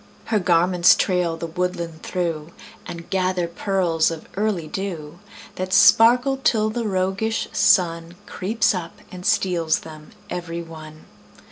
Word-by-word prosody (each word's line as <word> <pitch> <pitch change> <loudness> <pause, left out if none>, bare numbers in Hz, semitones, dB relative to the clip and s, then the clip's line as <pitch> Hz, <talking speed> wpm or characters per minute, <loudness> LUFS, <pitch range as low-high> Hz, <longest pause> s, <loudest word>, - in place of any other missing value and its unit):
Her 215 - +1
garments 180 0 +4
trail 180 -3 0
the 165 - -5
woodland 170 -1 -4
through, 170 -3 -4 0.3
And 170 0 -8
gather 185 -2 0
pearls 170 -2 0
of 165 -1 -8
early 200 -5 -1
dew 170 -3 -6 0.4
That 185 0 -3
sparkle 245 +6 +5
till 220 -5 +1
the 230 0 -3
roguish 195 +3 -1
Sun 170 -3 +2
Creeps 210 +4 0
up 175 -3 -6
and 180 -1 -9
steals 170 -4 +1
them 155 -1 -12 0.2
every 170 -1 -5
one. 155 -1 -12
180 Hz, 130 wpm, -22 LUFS, 165-195 Hz, 0.4 s, sparkle